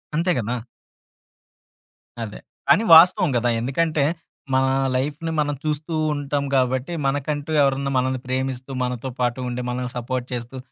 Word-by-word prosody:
అంతే 170 +3 +2
కదా! 120 +2 -2 1.6
అదే. 105 -2 -7 0.3
కానీ 215 - +5
వాస్తవం 180 +2 +7
కదా! 120 +1 +1
ఎందుకంటే, 150 +5 0 0.5
మనా 130 0 +3 0.3
లైఫ్‌ని 150 +5 -2
మనం 145 -1 0
చూస్తూ 155 +2 -2 0.2
ఉంటాం 145 0 -2
కాబట్టి, 130 +4 +1
మనకంటూ 145 +2 -2
ఎవరన్నా 135 0 +1
మనల్ని 130 0 0
ప్రేమిస్తూ, 130 0 -3
మనతో 125 +1 -3
పాటు 125 0 0
ఉండి 125 +1 -3
మనల్ని 125 0 -3
సపోర్ట్ 125 +1 -3
చేస్తూ, 120 +2 -5
135 Hz, 130 wpm, -22 LUFS, 125-150 Hz, 1.6 s, వాస్తవం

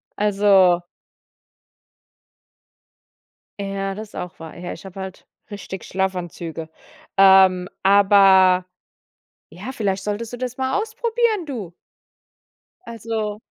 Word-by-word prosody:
Also 195 -3 +3 2.8
Ja, 195 -1 -3
das 215 +1 -9
auch 180 0 -7
wahr. 160 -1 -10
Ja, 175 0 -6
ich - - -11
habe 190 0 -11
halt 190 -1 -9 0.2
richtig 200 -2 -8
Schlafanzüge. 175 -4 -4 0.5
Ähm, 190 -2 +6 0.2
aber 195 -2 +5 0.8
ja, 190 - -8
vielleicht 195 -5 -2
solltest 215 +3 -4
du - - -5
das 255 0 -5
mal 260 +4 0
ausprobieren, 445 -3 -1
du. 220 - -6 1.1
Also 220 -2 -4
195 Hz, 95 wpm, -21 LUFS, 185-225 Hz, 2.8 s, Ähm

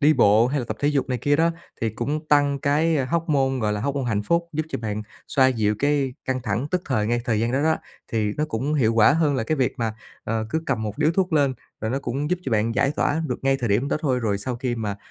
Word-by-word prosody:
đi 150 +1 +5
bộ 110 -2 +5
hay 140 +3 -1
là - - -4
tập 110 - -3
thể 145 - +2
dục 145 -2 0
này 125 -1 -1
kia 145 +4 +2
đó 165 +1 +3 0.3
thì 115 - 0
cũng 145 +8 -3
tăng 145 -1 +3
cái, 155 +4 +2
a, 135 - +1
hoóc-môn 140 -4 +1
gọi 105 -1 +1
là 105 - -2
hoóc-môn 140 +1 -1
hạnh 105 -3 0
phúc, 170 +7 0
giúp 155 +1 -2
cho - - -3
bạn 110 -1 -3 0.3
xoa 130 -2 +4
dịu 110 -4 +1
cái 140 -2 +1
căng 130 0 -1
thẳng 115 +4 -1
tức 180 -1 0
thời 110 -6 0
ngay 120 +1 +1
thời 110 -3 +1
gian 115 +2 0
đó 135 +3 +1
đó, 160 0 +3 0.4
thì 105 -2 0
nó 150 - +1
cũng 145 +2 -2
hiệu 115 -5 +2
quả 115 +5 +6
hơn 155 -3 +2
là 115 - 0
cái 155 - 0
việc 130 -2 +1
mà, 110 -2 -1 0.3
ờ, 110 0 -2
cứ 160 +4 -1
cầm 120 -5 0
một 105 +5 -4
điếu 155 +1 +3
thuốc 185 -1 0
lên 140 -4 +3 0.3
rồi 110 - -2
nó 135 - 0
cũng 140 +4 -3
giúp 180 - +1
cho 130 - -3
bạn 110 +1 +1
giải 140 - +2
tỏa 160 +3 +1
được - - -3
ngay 135 0 +3
thời 120 - -1
điểm 115 +8 +1
đó - - +1
thôi. 130 -5 +1
Rồi 105 -3 0
sau 125 +4 -3
khi 125 -1 -2
mà 105 -3 -3
130 Hz, 280 wpm, -23 LUFS, 115-145 Hz, 0.4 s, quả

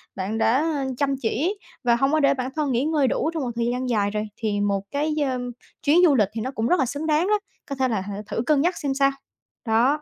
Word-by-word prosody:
bạn 195 +4 -3
đã, 225 +2 +3
ơ, 300 -2 0
chăm 280 -1 +1
chỉ 315 - 0 0.3
và 240 -1 +4
hông 270 +4 +1
có 310 - +3
để 280 -2 +4
bản 255 -1 -3
thân 300 -3 0
nghỉ 245 +1 +1
ngơi 305 -4 +2
đủ 310 - 0
trong 320 -4 -2
một 245 - -2
thời 235 0 0
gian 250 +1 -2
dài 205 -3 +1
rồi. 210 0 -1
Thì 205 -2 -1
một 200 -1 0
cái, 300 +2 -1 0.2
ơm, 245 -1 -3 0.3
chuyến 300 +4 +4
du 300 -5 +5
lịch 210 -6 +3
thì 225 - -3
nó 255 +4 -3
cũng 230 -3 -1
rất 360 - +3
là 265 - +3
xứng 285 +5 -4
đáng 310 +3 +2
đó, 420 0 +2 0.3
có 280 - -3
thể 260 -1 +1
là 220 -5 -1
hả 200 +1 -6
thử - - -2
cân 290 -1 +3
nhắc 350 +2 +1
xem 280 -3 -1
sao. 275 0 +3 0.5
Đó. 245 +7 +2
265 Hz, 270 wpm, -24 LUFS, 225-295 Hz, 0.5 s, du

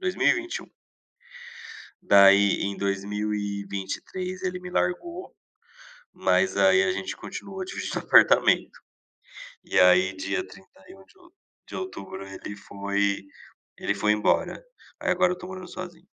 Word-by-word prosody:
2021. 355 -2 0 1.4
Daí 100 0 +6
em 100 0 -3
2023, 100 - -3
ele 180 -1 -2
me 180 0 -8
largou, 340 - -2 0.8
mas 190 - +1
aí 95 -1 +5
a 95 - +1
gente 95 0 -4
continuou 195 -1 -7
dividindo - - -4
apartamento. - - +4 0.9
E - - 0
aí 90 +1 +5
dia 95 +1 -3
31 95 - -17
de 385 - -25
ou 350 -1 -21 0.4
de - - -7
outubro 370 - -7 0.2
ele 105 - -6
foi 100 0 -2 0.6
ele 100 - -1
foi 105 +1 +2
embora. 105 - 0 0.4
Aí - - 0
agora 180 0 +3
eu 180 - -6
tô 180 - -9
morando 185 -1 -8
sozinho. 175 -1 -9
105 Hz, 120 wpm, -26 LUFS, -, 1.4 s, Daí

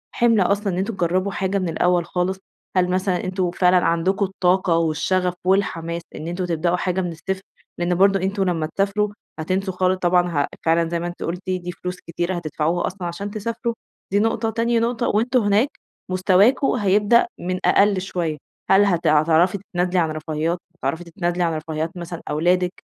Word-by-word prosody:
حِمل 230 -3 +4
أصلًا 200 +1 +1
إن - - -3
أنتم 195 +5 -1
تجرّبوا 185 +2 0
حاجة 195 0 -1
من 185 - -2
الأول 175 +1 +1
خالص؟ 180 +2 -1 0.4
هل 180 -1 +3
مثلًا 185 0 0
أنتم 185 -1 -1
فعلًا 180 0 +3
عندكم 185 +4 +1
الطاقة 185 -2 +1
والشَغَف 165 +3 +1
والحماس 170 -3 0
إن 155 - -6
أنتم 180 +2 -2
تبدأوا 170 +1 0
حاجة 185 +1 -1
من 175 -2 -3
الصفر؟ 190 +4 -4 0.4
لإن 175 0 +1
برضه 195 +1 +4
أنتم 195 +2 -1
لمّا 170 -4 0
تسافروا 200 +1 +1 0.3
هتنسوا 185 +4 -1
خالص 185 0 +1
طبعًا 180 0 +2
ها 145 -4 0 0.2
فعلًا 165 0 +2
زي 170 0 -1
ما 175 - -3
أنتِ 175 - -7
قُلتِ 175 +2 -3
دي 180 -1 -2
فلوس 180 +1 -6
كتيرة 175 +2 -2
هتدفعوها 165 +1 -1
أصلًا 185 -1 -5
عشان 195 +4 -5
تسافروا، 230 +2 -3 0.4
دي 205 - +3
نقطة 225 +1 +1
تاني 230 +1 +1
نقطة 235 +1 0
وأنتم 240 +4 +2
هناك 205 +6 +2 0.4
مستواكم 195 +8 +4
هيبدأ 210 - +3
من 185 +1 -3
أقل 200 -2 +4
شوية. 170 -5 -3 0.3
هل 200 +1 +6
هت 175 -4 +1
هتعرفي 160 +5 +4
تتنازلي 180 -2 -1
عن 160 -2 +1
رفاهيّات، 155 +2 -2 0.2
هتعرفي 160 +1 -3
تتنازلي 175 0 -2
عن 165 -1 +1
رفاهيّات 160 +2 -4
مثلًا 170 -1 -6
أولادِك؟ 180 +4 +1
180 Hz, 175 wpm, -22 LUFS, 170-195 Hz, 0.4 s, هل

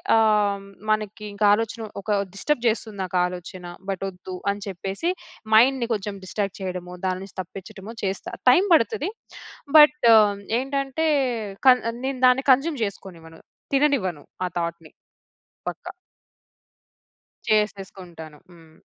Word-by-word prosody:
ఆహ్, 210 -3 +3 0.3
మనకింకా 210 -1 -1
ఆలోచన 225 +1 -1 0.2
ఒక 210 - -4 0.2
డిస్టర్బ్ 245 +5 -1
జేస్తుంది 220 -2 -1
నాకాలోచన. 180 0 -2 0.2
బట్ 195 0 -3
ఒద్దు 185 0 -10 0.2
అని 200 0 -6
చెప్పేసి, 195 - -3 0.4
మైండ్‌ని 245 +2 +5
కొంచెం 205 -1 -4
డిస్ట్రాక్ట్ 195 +1 -3
చేయడమో, 180 -1 -5
దాని 185 0 -1
నుంచి 195 - -13
తప్పించడమో 195 +4 -10
చేస్తా, 195 0 -3 0.2
టైం 360 - +5
బడతది. 300 - +2 0.7
బట్ 300 -5 +6 0.5
ఏంటంటే 275 +3 -2 0.6
క 255 -1 +9 0.3
నేను 265 -1 -2
దాన్ని 255 +2 +4
కన్జ్యూమ్ 275 0 +1
జేసుకోనివ్వను, 170 -5 -9 0.3
తిననివ్వను. 245 - +1 0.2
ఆ - - -2
థాట్‌ని 170 -1 -5 0.8
పక్క. - - -10 1.6
చేసేసుకుంటాను. 190 -7 -2
హ్మ్. 165 -2 -18
200 Hz, 110 wpm, -24 LUFS, 185-235 Hz, 1.6 s, క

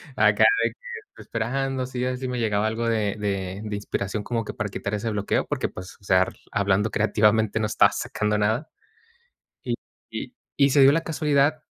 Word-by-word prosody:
Acá - - +4 0.2
de - - +3
que - - -23 0.3
estoy - - -14
esperando, 130 +3 -2
sí 125 -1 -3
así 130 0 -2
me 125 -1 -3
llegaba 110 -2 +1
algo 115 +1 -2
de 105 -3 0
de 100 -2 -3
de 105 -1 -4
inspiración 100 0 -3
como 115 0 -2
que - - -6
para 110 -4 -3
quitar 100 +1 -4
ese 105 +2 -1
bloqueo, 105 -1 0
porque, - - -1
pues, 90 +3 -10
o - - -26
sea 95 -1 +4
ar 95 - -1 0.2
hablando 100 +2 +1
creativamente 110 0 +2
no 110 - 0
estaba 105 - +4
sacando 105 0 -1
nada. 110 +9 0 0.9
Y - - -1 0.3
y - - -6 0.2
y 140 -1 +5
se 140 - +5
dio 135 +1 +8
la 165 +2 +2
casualidad 150 -1 +1
110 Hz, 195 wpm, -25 LUFS, 105-130 Hz, 0.9 s, dio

